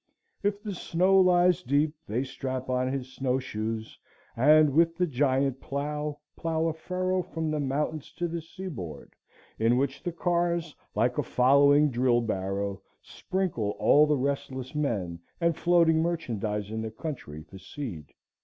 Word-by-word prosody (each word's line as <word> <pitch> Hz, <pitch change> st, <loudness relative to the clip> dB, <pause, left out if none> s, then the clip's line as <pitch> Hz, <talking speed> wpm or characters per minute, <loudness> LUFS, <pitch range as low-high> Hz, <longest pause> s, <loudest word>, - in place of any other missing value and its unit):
If 205 Hz, +1 st, -1 dB
the 210 Hz, -2 st, -4 dB
snow 185 Hz, +2 st, +2 dB
lies 180 Hz, -1 st, +4 dB
deep, 150 Hz, 0 st, +1 dB
they 120 Hz, +5 st, -1 dB
strap 130 Hz, -1 st, -4 dB
on 130 Hz, 0 st, 0 dB
his 130 Hz, -1 st, -4 dB
snow 130 Hz, -1 st, 0 dB
shoes, 110 Hz, -3 st, -4 dB, 0.4 s
and 150 Hz, +4 st, +6 dB
with 165 Hz, +3 st, +3 dB
the 180 Hz, -, +2 dB
giant 135 Hz, -2 st, +1 dB
plow, 150 Hz, +1 st, -3 dB, 0.2 s
plow 165 Hz, -1 st, -1 dB
a 165 Hz, -, +1 dB
furrow 185 Hz, +3 st, -1 dB
from 160 Hz, -3 st, -3 dB
the 155 Hz, -, -1 dB
mountains 145 Hz, +2 st, -2 dB
to 175 Hz, -, -2 dB
the 170 Hz, 0 st, -4 dB
seaboard, 160 Hz, -, -8 dB, 0.5 s
in 115 Hz, +2 st, +3 dB
which 135 Hz, +1 st, -1 dB
the 175 Hz, -, -3 dB
cars, 170 Hz, -1 st, 0 dB, 0.2 s
like 120 Hz, +4 st, +1 dB
a -, -, +1 dB
following 140 Hz, +3 st, +4 dB
drill 120 Hz, 0 st, +2 dB
barrow, 100 Hz, -2 st, -2 dB, 0.2 s
sprinkle 170 Hz, -, -2 dB
all 150 Hz, +1 st, +5 dB
the 150 Hz, -1 st, +2 dB
restless 130 Hz, -1 st, -3 dB
men 105 Hz, -, -2 dB, 0.2 s
and 170 Hz, -2 st, +2 dB
floating 170 Hz, -2 st, +4 dB
merchandise 110 Hz, -, -2 dB
in 110 Hz, 0 st, -3 dB
the 110 Hz, -, -3 dB
country 110 Hz, -, -7 dB
for 90 Hz, +5 st, -13 dB
seed. 95 Hz, -, -7 dB
140 Hz, 155 wpm, -28 LUFS, 120-165 Hz, 0.5 s, and